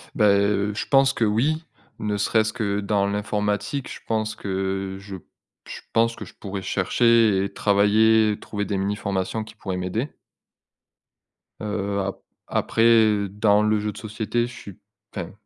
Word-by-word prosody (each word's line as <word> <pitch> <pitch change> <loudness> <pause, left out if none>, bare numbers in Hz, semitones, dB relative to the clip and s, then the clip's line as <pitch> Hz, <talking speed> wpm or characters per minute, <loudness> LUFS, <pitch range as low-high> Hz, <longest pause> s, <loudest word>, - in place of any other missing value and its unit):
Bah, 105 - +4
heu, 100 +1 +2
je - - -3
pense 135 0 +4
que 115 - +1
oui. 140 +10 +1 0.4
Ne 105 -1 -1
serait-ce 110 +1 +1
que 105 -4 -1
dans 100 -1 +1
l'informatique, 105 +5 -2
je - - -8
pense 110 -1 -1
que 95 0 -3
je 100 0 -8 0.5
je - - -8
pense 115 0 +2
que - - -8
je - - -14
pourrais 100 -1 -6
chercher 110 0 +3
et 100 - -4
travailler, 105 +1 +3
trouver 105 -1 -4
des 100 - -2
mini-formations 100 +1 -2
qui 110 +1 -12
pourraient 95 -4 -5
m'aider. 95 +10 -2 1.5
Heu, 100 -1 -2
a 100 0 -3 0.3
après, 110 -3 +3
dans 105 +1 +3
le 105 0 +2
jeu 105 0 -2
de 105 - -13
société, 110 +2 -2
je 120 - -11
suis 100 -5 -11 0.4
enfin, 90 -3 -5
105 Hz, 155 wpm, -23 LUFS, 100-110 Hz, 1.5 s, Bah